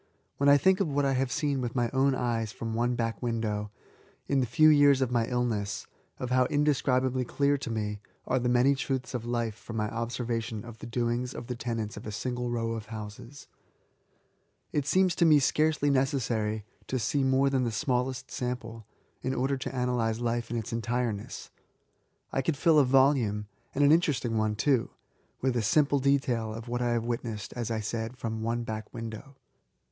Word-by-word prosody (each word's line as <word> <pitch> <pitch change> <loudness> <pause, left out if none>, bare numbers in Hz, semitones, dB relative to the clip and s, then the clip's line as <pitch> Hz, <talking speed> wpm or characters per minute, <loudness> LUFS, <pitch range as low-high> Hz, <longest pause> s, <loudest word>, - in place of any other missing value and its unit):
When 140 0 +4
I 140 - +8
think 190 +7 +3
of 195 - +1
what 145 -1 +1
I 135 - +2
have 130 -1 0
seen 140 0 0
with 120 -1 -3
my 120 -2 +1
own 135 0 +3
eyes 115 -4 -1
from 115 -1 -5
one 120 +2 +1
back 115 -3 -2
window^ 110 -3 -2 0.6
in 140 - +2
the 125 - +1
few 155 +7 +5
years 145 -2 +6
of 130 -2 0
my 115 -2 +1
illness; 115 -5 -1 0.3
of 125 -1 -4
how 130 0 +4
indescribably 130 -3 +1
clear 140 +3 +1
to 130 - -5
me 105 -2 -2 0.3
are 130 0 +1
many 125 +2 +3
truths 135 -1 -3
of 120 -2 -3
life 120 -2 -1
from 115 +2 -10
my 105 -1 0
observation 115 -1 -3
of 115 -2 -10
the - - -8
doingd 120 +1 -1
of - - -6
the 125 - -4
tenants 115 -3 -4
of 105 - -8
a - - -4
single 125 +3 -3
row 115 -1 -1
of 115 -1 -5
houses; 110 +5 -8 1.3
it 145 -2 0
seems 185 +2 +3
to - - +3
me 155 -3 +7
scarcely 150 +1 +2
necessary 115 -6 0 0.2
to 130 - -1
see 135 +3 0
more 135 +1 +3
than 130 -2 +2
the 120 - 0
smallest 130 +1 -1
sample^ 115 -3 -4 0.4
in 130 +1 -2
order 135 +2 +1
to 130 - -4
analyse 120 -3 0
life 120 -1 -1
in 120 - -2
its 115 +1 -4
entireness. 115 -2 -3 0.8
I 135 - 0
could 145 +2 -1
fill 160 0 +5
a - - +6
volume 125 -6 +3
— 120 0 -40
and 145 - +3
an 145 - +6
interest* 155 -6 +3
ing 115 -1 -1
one 110 -1 +1
too 125 +2 +2 0.3
— - - -40
with 130 -1 +1
a 120 - +2
simple 140 +6 +3
detail 130 -5 +1
of 115 +1 -8
what 120 +1 -2
I 120 - +1
have 115 -1 0
witnessed, 115 -3 -4
as 120 -2 -3
.1 110 -2 -2
said, 115 +3 -4
from 110 -2 -4
one 115 +1 -1
back 110 -1 -5
window. 115 +4 -7
120 Hz, 200 wpm, -29 LUFS, 115-135 Hz, 1.3 s, I